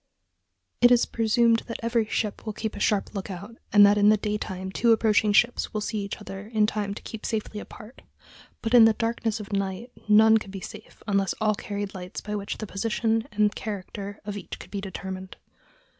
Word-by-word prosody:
It 245 - +8
is 245 -1 +5
presumed 230 0 +3
that 230 - -5
every 230 -1 +1
ship 210 -1 -2
will 215 - -4
keep 220 +1 -4
a - - -6
sharp 205 -2 +1
lookout, 200 +3 -7
and 205 -1 +8
that 205 +1 +4
in 205 +1 +6
the 215 - +5
daytime 195 -3 -4
two 230 +3 +4
approaching 215 -1 +3
ships 235 +2 +2
will 215 - 0
see 215 +1 -2
each 200 -1 -4
other 200 -1 -8
in 215 -2 +2
time 205 -2 -2
to - - -10
keep 220 - -8
safely 215 -1 -3
apart; 220 +3 -12 0.6
but 225 0 -2
in 235 -2 +9
the 225 - +5
darkness 225 -1 -1
of 205 -1 -8
night 195 +4 -2 0.2
none 220 +1 +6
could 200 - -10
be 195 0 -6
safe 215 +3 -11
unless 195 -2 +1
all 215 -1 +2
carried 205 -1 -5
lights 180 -1 -7
by 210 - -6
which 200 -1 -4
the 215 - -5
position 225 +2 -1
and 210 0 +2
character 200 -1 -6
of 205 -1 -4
each 205 - -7
could - - -13
be 200 - -3
determined. 190 -1 -7
210 Hz, 205 wpm, -26 LUFS, 200-225 Hz, 0.6 s, in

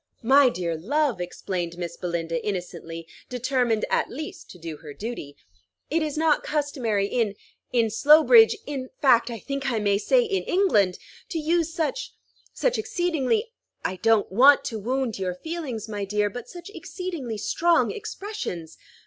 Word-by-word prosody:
"My 270 +3 +6
dear 175 -7 -2
love," 255 - 0
explained 175 -1 -4
Miss 170 -1 -5
Belinda 165 -2 -3
innocently, 170 -4 -5 0.2
determined 250 -3 0
at - - +1
least 305 +4 -7
to - - -11
do 165 -2 -7
her 150 -2 -11
duty, 210 -11 -6 0.5
"it 325 +2 +2
is 305 -1 -2
not 315 -1 +3
customary 260 -9 -1
in 215 -1 0 0.4
in 230 -3 +2
Slowbridge, 310 - +7
in 265 -3 -5
fact, 250 -5 +4
I 235 - -5
think 275 +5 -3
I 235 - 0
may 205 -1 +2
say - - +3
in 395 -4 -1
England, 210 - +2 0.3
to 335 - -3
use 330 +1 +1
such 330 +8 -3 0.4
such - - 0
exceedingly 355 - 0 0.3
I 185 - -1
don't 225 +1 +2
want 270 +8 +6
to 225 -3 -3
wound 250 0 -2
your 180 -2 -2
feelings, 280 - -5
my 205 -2 -4
dear, 205 +1 0
but 245 +2 -8
such 350 +2 -10
exceedingly 335 - -5
strong 335 - +2
expressions! 395 - -6
245 Hz, 155 wpm, -25 LUFS, 195-310 Hz, 0.5 s, Slowbridge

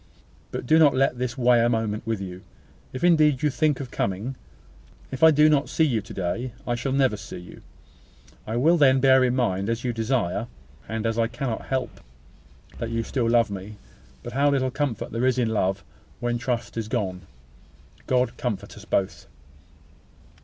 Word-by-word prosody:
But - - -5
do 160 +5 +4
not 150 -3 +5
let 130 -2 +1
this 125 +1 -3
weigh 120 -2 +4
a 120 - +3
moment 110 -2 -2
with 115 -3 -1
you, 90 -1 -7 0.5
if 130 - -6
indeed 155 -5 +4
you 150 - +3
think 150 0 +1
of 130 -3 -6
coming. 100 +7 -2 0.8
If 130 - -6
I 160 - +9
do 150 0 +5
not 145 -2 +2
see 160 - +1
you 120 -8 +1
to - - -13
day, 110 +7 -3
I 120 - -1
shall 130 +3 -2
never 130 -4 +2
see 100 -1 -9
you. 90 0 -12 0.9
I 110 - -3
will 160 +8 +4
then 135 -3 +5
bear 130 0 +5
in 125 0 +1
mind, 100 -5 0
as 115 +1 -2
you 125 -2 -1
desire, 115 -3 -1 0.4
and 110 0 -3
as 115 0 0
I 115 - +3
cannot 120 0 -4
help, 130 -1 -3 0.8
that 115 - -3
you 115 0 -1 0.3
love 115 -2 +3
me 95 -2 -5
still; 105 +2 -10 0.5
but 120 - -7
how 140 +2 +3
little 130 -2 +1
comfort 135 -5 -2
is - - -18
there 115 +2 -2
in 130 - +4
such 125 - +1
love, 100 -2 0 0.4
when 120 0 -1
trust 120 -1 -3
is 110 -2 -2
gone! 100 -6 -2 0.9
God 125 -2 +1
comfort 105 -5 -4
us 105 - -12
both! 95 -3 -1
120 Hz, 190 wpm, -25 LUFS, 110-130 Hz, 0.9 s, I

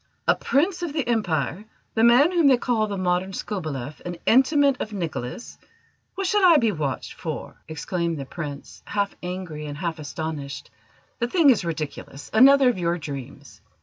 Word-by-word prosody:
A - - +6
Prince 345 +7 0
of 340 -4 -3
the 300 -5 -2
Empire, 190 - 0 0.3
the 225 - +2
man 245 +8 +6
whom 340 -5 +3
they 260 -2 +6
call 235 -3 0
the 200 -1 -4
Modern 185 +1 0
Skobeleff, 155 - -5
an 175 -1 -5
intimate 275 +2 +4
of 215 - -4
Nicholas! 165 - -5 0.6
What 390 - -2
should 410 +2 +2
I 345 -4 +8
be 230 -5 +2
watched 150 -7 -3
for?" - - -6
exclaimed 170 +1 -2
the 140 - -5
Prince, 145 -1 -8
half 200 -1 -2
angry 180 -4 -5
and 145 0 -6
half 165 -1 -3
astonished. 145 0 -6 0.5
"The 240 - 0
thing 300 +1 +5
is 225 - +1
ridiculous; 155 -3 -6
another 270 +4 +7
of 245 -6 +1
your 170 0 0
dreams!" 140 -5 -8
185 Hz, 170 wpm, -24 LUFS, 155-255 Hz, 0.6 s, I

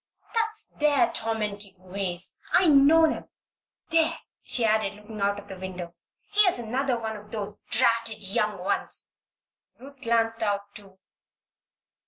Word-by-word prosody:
That's 445 -1 -1
their 300 +3 +3
tormenting 210 -3 -2
ways 185 -1 -3
I 365 - +5
know 305 +2 +6
'em! 315 - -2 0.6
There!" 325 0 +4 0.2
she 240 - +1
added, 215 -2 +1
looking 210 0 -10
out 200 0 +1
of 205 0 -10
the 190 -2 -9
window. 180 -2 -6 0.4
"Here's 410 -4 +4
another 245 +2 -1
of 210 -1 -6
those 210 -1 -3
dratted 230 -3 +2
young 210 0 0
ones!" 185 +3 -1 0.6
Ruth 275 +1 -14
glanced 230 0 +1
out, 205 -1 -2
too. 195 -3 -14
220 Hz, 130 wpm, -26 LUFS, 200-270 Hz, 0.6 s, know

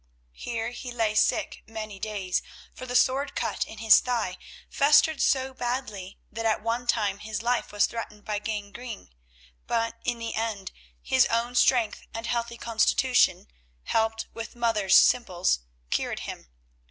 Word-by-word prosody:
Here 230 - -4
he 245 0 -7
lay 225 -3 0
sick 215 - +1
many 215 -2 -7
days, 195 -3 -2 0.3
for 255 - -9
the 245 - -4
sword 265 +3 +2
cut - - -1
in 220 - -11
his 220 0 +7
thigh 230 -7 -2 0.3
festered 300 +1 +4
so 265 0 +2
badly 240 -7 -4
that 225 +1 -4
at 220 -1 +1
one 235 +2 -2
time 205 -4 +1
his 215 +1 -5
life 245 +1 0
was 205 - +3
threatened 210 -3 -7
by 210 -1 -2
gangrene, 210 - -6 0.6
but, 230 0 -1
in 240 0 -1
the 230 0 -4
end, 220 -4 -3 0.3
his 65 - +4
own 235 +1 0
strength 245 -3 +3
and 225 0 -4
healthy 235 0 -2
constitution, 230 - +2 0.4
helped 225 0 0
with 230 +1 -7
Martha's 225 -5 +2
simples, 180 - +4 0.3
cured - - -1
him. - - -7
230 Hz, 150 wpm, -27 LUFS, 210-245 Hz, 0.6 s, his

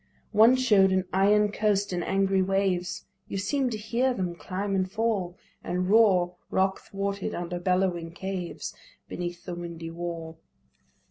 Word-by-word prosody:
One 225 +4 +6
show'd 210 -7 +4
an 190 0 +1
iron 205 +2 +4
coast 205 -2 +1
and 175 -1 -1
angry 195 0 +2
waves 185 -1 0 0.2
You - - -4
seem'd 255 +6 0
to - - -2
hear 240 +4 0
them 180 -4 -2
climb 185 +5 -4
and 185 -1 0
fall 205 -5 -1 0.3
And 180 +2 -1
roar 185 -5 +4
rock 190 0 +1
thwarted 200 0 -3
under 175 0 -4
bellowing 180 -2 0
caves, 185 -1 -5 0.3
Beneath 175 0 -5
the 180 - -4
windy 170 -1 -6
wall. 165 -1 -6
190 Hz, 145 wpm, -27 LUFS, 175-205 Hz, 0.3 s, One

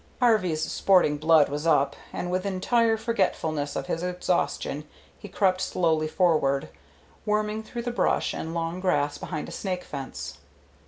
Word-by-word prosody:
Harvey's 185 -10 +2
sporting 180 -2 +3
blood 155 0 +5
was 150 +3 -3
up, 140 -3 +3 0.2
and 180 - -4
with 185 0 0
entire 225 +4 +2
forgetfulness 160 -10 -1
of 135 - -2
his 165 - -2
exhaustion 180 -4 -1 0.3
he - - -9
crept 185 -1 +1
slowly 160 -3 +1
forward, 155 -5 +2 0.5
worming 210 0 0
through 235 +2 -6
the 245 - -2
brush 240 - +1
and 165 +1 -5
long 165 +1 -2
grass 150 -6 0
behind 155 -4 -5
a - - -8
snake 185 -2 -3
fence. 135 - -7
180 Hz, 150 wpm, -26 LUFS, 155-195 Hz, 0.5 s, blood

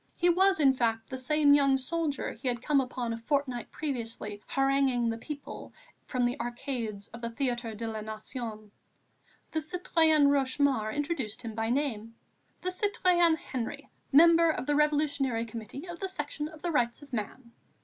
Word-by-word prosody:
He 350 - +3
was, 380 +1 +4
in 275 -3 +6
fact, 225 -2 -1
the - - -2
same 290 +2 +4
young 275 -2 +5
soldier 300 +1 -2
he 250 +4 -7
had 240 -1 -1
come 285 -2 +3
upon 250 -2 -3
a 230 - -5
fortnight 260 -1 -1
previously 230 -7 -4
haranguing 270 -3 +2
the 225 - -2
people 290 +2 -8 0.3
from 250 -2 0
the 245 +4 -1
arcades 240 -4 -4
of 235 - -10
the 235 - -3
Théâtre 240 -3 -2
de 230 - -4
la 220 -1 -4
Nation. 215 0 -7 0.8
The 320 - 0
citoyenne 315 -2 +3
Rochemaure 270 -5 +2
introduced 280 -5 -3
him 225 -1 -5
by 225 +1 -2
name: 230 -4 -1 0.5
"The 365 - -1
citoyen 365 -4 +3
Henry, 255 -6 -5 0.2
Member 335 +3 +7
of 310 - -1
the 295 - +1
Revolutionary 285 -5 +1
Committee 230 - -8
of 345 -1 -7
the 390 - -2
Section 295 -3 -4
of 315 -1 -13
the 350 - 0
Rights 245 -2 0
of 280 -2 -16
Man." 235 +2 -5
270 Hz, 170 wpm, -29 LUFS, 230-300 Hz, 0.8 s, Member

